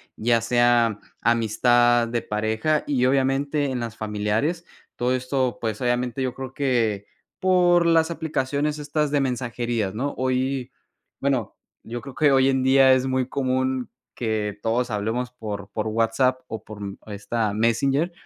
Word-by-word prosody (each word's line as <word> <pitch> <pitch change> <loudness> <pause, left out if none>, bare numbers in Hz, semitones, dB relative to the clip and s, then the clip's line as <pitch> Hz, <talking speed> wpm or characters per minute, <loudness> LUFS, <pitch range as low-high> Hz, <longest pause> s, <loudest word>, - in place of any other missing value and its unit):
ya 115 0 +2
sea 120 -2 +3 0.2
amistad, 120 +1 +3
de 115 0 -2
pareja 110 +8 0
y 130 -4 0
obviamente 140 +2 +1
en 125 - -2
las 115 -2 -5
familiares. 110 +10 -1 0.3
Todo 125 +1 0
esto, 130 0 -1
pues, 110 -1 -3
obviamente, 125 +1 0
yo 130 -1 -2
creo 130 -1 -7
que 115 -7 0 0.3
por 175 -2 +4
las 165 0 +3
aplicaciones 150 -2 -1
estas 150 0 -1
de 145 0 +1
mensajerías, 120 -5 -2
¿no?, 140 +5 -2
hoy, 130 0 -1 0.5
bueno, 135 -6 -1 0.3
yo 120 +2 -6
creo 135 - -9
que 145 +2 +3
hoy 135 0 +4
en 130 -1 +1
día 130 0 +6
es 130 0 +1
muy 130 -1 0
común 130 -1 -1 0.2
que 110 -3 -2
todos 120 +2 0
hablemos 110 +4 -2
por 105 -5 -7
por 110 +1 -2
WhatsApp, 115 +4 +1
o 110 -4 -7
por, 110 -2 -10
mm, 100 -1 -6
esta 105 +1 -2
Messenger, 135 - +1
125 Hz, 150 wpm, -24 LUFS, 115-135 Hz, 0.5 s, día